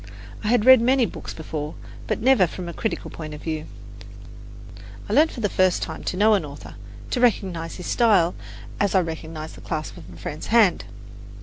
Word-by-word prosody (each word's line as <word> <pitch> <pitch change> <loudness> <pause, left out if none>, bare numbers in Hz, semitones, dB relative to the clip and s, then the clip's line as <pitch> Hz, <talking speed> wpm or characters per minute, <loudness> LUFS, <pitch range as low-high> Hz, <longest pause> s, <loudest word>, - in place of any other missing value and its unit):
I - - -2
had 235 -1 +3
read 260 -2 +9
many 255 +1 +3
books - - -7
before, 155 -1 -5 0.3
but - - -1
never 250 -8 +5
from 180 +2 -7
a 170 - -6
critical 220 - -3
point 155 -2 -7
of 150 - -11
view. 155 -1 -4 1.4
I - - -3
learned 315 +2 +5
for 240 - -7
the 210 - +2
first 185 -2 +2
time - - -6
to 180 - -2
know 215 +2 +5
an 195 -5 +2
author, 145 -1 -10 0.4
to 250 - 0
recognize 185 -8 0
his 180 - -8
style 200 -8 +3 0.5
as 200 -1 +1
I 190 - +5
recognize 160 -1 -6
the - - -13
clasp 155 -1 -5
of 85 +2 -12
a 85 - -12
friend's 150 - -6
hand. 220 -5 +4
180 Hz, 195 wpm, -23 LUFS, 160-225 Hz, 1.4 s, read